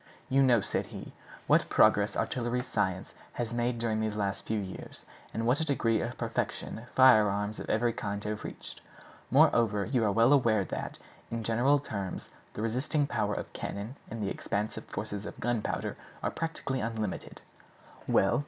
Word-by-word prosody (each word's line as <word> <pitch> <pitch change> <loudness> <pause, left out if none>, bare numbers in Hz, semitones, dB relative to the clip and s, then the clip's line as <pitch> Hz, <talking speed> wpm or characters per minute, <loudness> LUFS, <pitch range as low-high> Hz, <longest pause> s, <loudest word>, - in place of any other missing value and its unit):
"You 135 +1 +4
know," 125 -5 +5
said - - -2
he, - - -9 0.3
"what - - +3
progress - - +4
artillery 125 0 -1
science 100 -7 -1 0.2
has 120 -1 -3
made 120 0 0
during 115 -2 0
the 110 0 +1
last 100 -2 -3
few 110 - 0
years, 95 -2 -7 0.3
and 115 - -2
what 125 +4 +3
a - - +1
degree 120 -7 +1
of - - -4
perfection 115 +2 -3
firearms 105 -5 +5
of - - -6
every 115 +1 +2
kind 100 -1 -4
have 105 0 -3
reached. - - -8 0.5
Moreover, 105 -3 +4
you 125 -4 +1
are 105 - +3
well 115 +6 +5
aware 115 -7 +4
that, - - -5 0.3
in 115 -1 -3
general 120 +6 +3
terms, 100 -9 -5 0.3
the 105 - -3
resisting 130 +6 +1
power 105 -6 -1
of - - -6
cannon 105 +6 -5
and 115 -2 -4
the 100 - -1
expansive 105 +2 -3
force 105 0 -5
of 105 0 -6
gunpowder 120 -2 -1 0.3
are - - 0
practically 160 -5 -3
unlimited. 110 -3 -4 0.6
Well! 95 - +3
115 Hz, 165 wpm, -30 LUFS, 105-120 Hz, 0.6 s, know